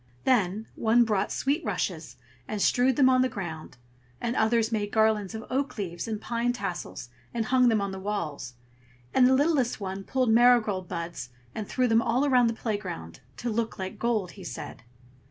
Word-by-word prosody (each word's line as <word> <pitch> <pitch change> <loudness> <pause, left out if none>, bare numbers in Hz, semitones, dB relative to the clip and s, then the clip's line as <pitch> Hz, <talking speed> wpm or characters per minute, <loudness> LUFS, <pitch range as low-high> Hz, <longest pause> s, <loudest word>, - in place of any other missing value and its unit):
Then 215 -4 +2
one 230 +1 +3
brought 210 -4 0
sweet 290 +5 0
rushes 160 -8 -3 0.3
and 215 - -3
strewed 250 +5 +3
them 265 0 +5
on 255 0 +5
the 255 - +2
ground; 160 - -7 0.4
and 235 +1 -2
others 225 +1 +2
made 205 -2 -1
garlands 220 -2 +2
of 220 - -6
oak 275 +1 -1
leaves 175 -1 -4
and 220 -2 -3
pine 235 +2 -1
tassels 245 - -5 0.3
and 230 -2 0
hung 255 0 +4
them 220 -3 +2
on 200 -1 -2
the 190 - -6
walls; 165 -11 -4 0.6
and 250 - +6
the 260 - +5
littlest 280 -5 +2
one 195 -1 -5
pulled 255 +1 +1
marigold 220 -5 +4
buds 170 -7 -5 0.2
and 215 -2 -5
threw 255 -1 +1
them 225 -1 +4
all 250 +3 +1
about 250 -4 +4
the 230 - 0
playground, 185 - -5 0.2
"to 240 - -3
look 225 0 -2
like 190 -1 -6
gold," 220 -7 0
he 195 - -12
said. - - -7
220 Hz, 185 wpm, -27 LUFS, 195-245 Hz, 0.6 s, and